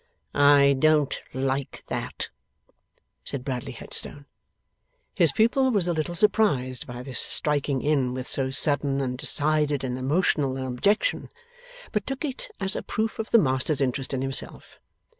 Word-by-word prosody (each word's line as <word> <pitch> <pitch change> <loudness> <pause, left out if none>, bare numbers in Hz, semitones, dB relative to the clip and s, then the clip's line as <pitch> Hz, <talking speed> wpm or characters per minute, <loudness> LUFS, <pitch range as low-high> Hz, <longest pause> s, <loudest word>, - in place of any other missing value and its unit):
'I 140 -1 +5
don't 155 -1 +2
like 135 +1 -3
that,' - - -4 0.9
said 130 -2 -5
Bradley 130 -3 -4
Headstone. 145 0 -3 0.9
His 170 -6 +4
pupil 240 - +2
was 200 -7 +1
a 175 - +1
little 160 +2 -3
surprised 165 - +2
by 120 0 -7
this 130 -2 -3
striking 145 -3 0
in 140 -4 +1
with 130 -1 -5
so 135 -1 -1
sudden 140 0 +2
and 130 -2 -2
decided 150 +1 +2
and 125 -1 -3
emotional 140 -1 +1
an 130 - -4
objection, 200 - 0 0.6
but 210 -3 -2
took 270 +3 -3
it 270 -3 -5
as 190 0 -1
a - - -2
proof 220 +1 -3
of 220 - -3
the - - +6
master's 130 - +1
interest 135 0 -1
in 135 -1 -2
himself. 135 0 -4
145 Hz, 150 wpm, -25 LUFS, 130-175 Hz, 0.9 s, the